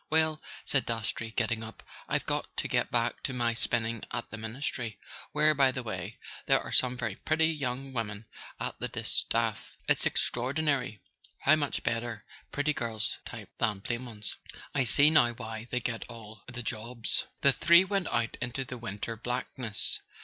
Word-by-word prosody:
"Well," 155 0 +3 0.2
said 135 - +3
Dastrey, 115 0 -1
getting 110 0 0
up, 110 0 -9 0.3
"I've - - +1
got - - 0
to - - 0
get - - +1
back - - +1
to 130 - -2
my 120 -2 +2
spinning 115 -1 0
at 120 0 -4
the 115 - -5
Ministry; 115 -1 -3 0.3
where, 150 +1 +5
by 135 -2 +5
the 130 -1 -3
way, 100 -1 -4 0.3
there - - +6
are - - -7
some 125 -1 +3
very 115 -5 -2
pretty 160 +1 +3
young 135 -2 -3
women 110 -3 -2 0.3
at - - -3
the - - +1
distaff. - - -1
It's - - +4
extraordinary 130 -2 0 0.4
how 155 - +7
much 145 -2 -1
better 115 -1 -1 0.3
pretty 145 +1 +1
girls 115 -1 -2
type 110 -4 -8
than 105 -5 +1
plain 120 +4 -2
ones; 105 -3 -6 0.4
I 130 - +3
see 145 +6 +6
now 120 -7 +6
why 110 -1 -6
they 125 - +1
get 115 -1 -3
all 110 -3 -10
the 120 0 -5
jobs." 115 +1 -1
The 140 - +6
three 170 +5 +7
went 195 -2 0
out 115 -1 0
into 125 +2 -2
the 125 -1 -6
winter 115 0 -4
blackness. 120 -1 -1
120 Hz, 170 wpm, -30 LUFS, 110-135 Hz, 0.4 s, how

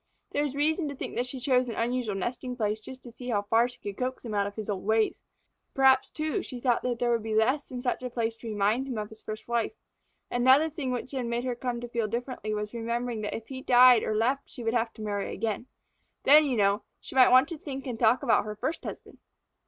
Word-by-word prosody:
There 290 - +1
is 280 -2 -3
reason 310 +3 +1
to 280 - -6
think - - -6
that 245 +1 -1
she 260 +1 -6
chose 255 -1 +2
an 230 - -4
unusual 235 -3 -1
nesting 250 +5 -3
place 215 -2 0
just 260 +3 -10
to 240 - -10
see 245 +1 -8
how 205 -3 +1
far 225 +4 +3
she 245 - -13
could 200 -1 -6
coax 255 0 -3
him 220 - -4
out 200 -1 +1
of 205 - -8
his 215 -2 -5
old 200 -3 -3
ways. 220 +1 +1 0.6
Perhaps, 265 -1 +5
too, 310 +5 -2
she 250 -7 -8
thought 240 -1 +2
that 245 -1 -1
there 240 0 +1
would 230 -1 +1
be 220 0 -3
less 260 +7 +2
in 250 -1 -6
such 250 - -1
a 250 - -4
place 230 -1 -2
to 230 - -9
remind 215 +5 +1
him 250 -4 -4
of 210 -1 -4
his 220 0 -14
first 215 0 -7
wife. 235 - 0 0.6
Another 260 +6 +4
thing 290 -4 -4
which 250 +1 -4
had 260 -4 -2
made 235 +1 -1
her 255 -1 -1
come 240 0 -3
to 240 - -5
feel 235 -2 -1
differently 235 -1 -4
was 210 0 -3
remembering 235 0 -2
that 210 - -3
if 225 - -12
he 260 -1 -6
died 250 -2 +7
or 215 - -1
left 250 +6 +1
her - - -41
she 245 - -9
would 225 0 0 0.2
marry 205 -2 -3
again. 225 +3 -3 0.6
Then, 300 +2 +7
you 260 -4 0
know, 200 +1 +3 0.2
she - - -11
might 260 -1 +7
want 255 +2 +6
to 330 -3 -6
think 270 -2 -6
and 240 -4 -4
talk 235 +3 +4
about 235 -5 +3
her 210 0 -5
first 310 +10 -3
husband. - - -8
240 Hz, 255 wpm, -28 LUFS, 220-260 Hz, 0.6 s, died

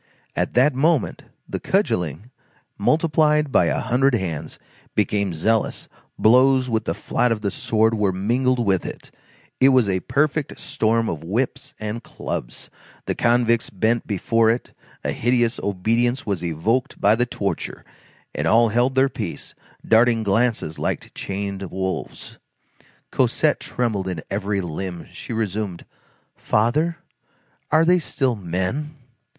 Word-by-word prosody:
At - - -1
that 135 +4 +5
moment, 150 +1 +1 0.2
the - - -4
cudgelling, 95 - -1 0.4
multiplied 150 +3 +2
by - - +4
a - - 0
hundred 130 +1 +2
hands, 85 -8 -4 0.4
became 100 -2 +1
zealous, 110 +7 0 0.3
blows 130 +2 +4
with 110 0 0
the - - -1
flat 125 - 0
of 110 -2 -1
the 100 -2 -1
sword 110 +3 +1
were 105 -3 +1
mingled 120 +7 +1
with 100 -6 +1
it, - - -8 0.5
it 135 - +6
was 130 -5 +4
a 95 -1 +1
perfect 145 - -1
storm 115 +1 0
of 80 -2 -4
whips 115 +9 -2
and 110 +2 -4
clubs; - - -6 0.3
the - - -1
convicts 115 -1 +2
bent 110 +4 0
before 110 +3 +2
it, 115 +2 -1 0.3
a - - -1
hideous 120 0 +1
obedience 115 +6 0
was 100 -4 -2
evoked 90 +10 -1
by 105 - +4
the 120 +2 +1
torture, 100 -4 -4 0.5
and - - -1
all 115 0 +5
held 120 +4 +1
their 135 +1 +4
peace, 105 -9 -6 0.3
darting 115 0 +4
glances 110 -5 0
like - - -3
chained 100 -1 -4
wolves. 95 0 -5 0.7
Cosette - - +2
trembled 110 -6 -2
in 90 -4 -4
every 100 0 -1
limb; 90 +1 -5
she - - -9
resumed:— 105 -4 -3 0.5
"Father, 150 +10 +1 0.7
are 160 +1 +4
they 180 +1 +5
still 135 -6 -1
men?" 95 - -3
115 Hz, 135 wpm, -22 LUFS, 100-125 Hz, 0.7 s, it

